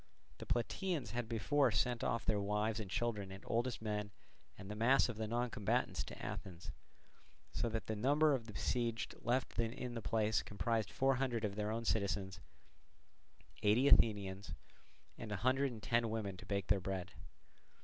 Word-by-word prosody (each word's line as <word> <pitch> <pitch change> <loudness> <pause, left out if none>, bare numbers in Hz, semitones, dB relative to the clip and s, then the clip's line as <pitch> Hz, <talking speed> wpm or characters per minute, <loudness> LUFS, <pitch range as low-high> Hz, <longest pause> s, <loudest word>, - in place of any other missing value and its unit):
The - - -8
Plataeans 135 - -1
had 120 -1 -3
before 135 +4 +3
sent 115 +2 +1
off 115 - 0
their 105 -1 +2
wives 105 +2 0
and 105 -3 -5
children 105 -2 -1
and 95 +1 -9
oldest 120 0 -1
men 105 -1 -2 0.5
and 95 - -9
the 105 - -5
mass 125 +5 +4
of 115 - -4
the 110 0 -2
non 120 +2 -1
combatants 105 - 0
to - - -9
Athens; 95 -1 -6 0.8
so 120 - 0
that 115 0 -3
the 110 - -2
number 145 +7 +4
of 120 -4 -2
the 110 - -8
besieged 115 +1 -1
left 125 -1 0
in 120 +2 -2
the 115 - -4
place 110 0 +1
comprised 110 -1 -1
four 135 0 +2
hundred 120 -4 0
of 100 - -2
their 105 +1 -2
own 115 +1 -2
citizens, 100 -3 0 1.2
eighty 110 +7 +4
Athenians, 100 -5 +3 0.6
and 110 - -6
a - - 0
hundred 135 +1 +3
and 110 -3 -9
ten 115 -1 +2
women 105 -3 -2
to - - -11
bake 100 -2 -1
their 100 -1 +2
bread. 95 -1 -3
110 Hz, 175 wpm, -37 LUFS, 105-120 Hz, 1.2 s, mass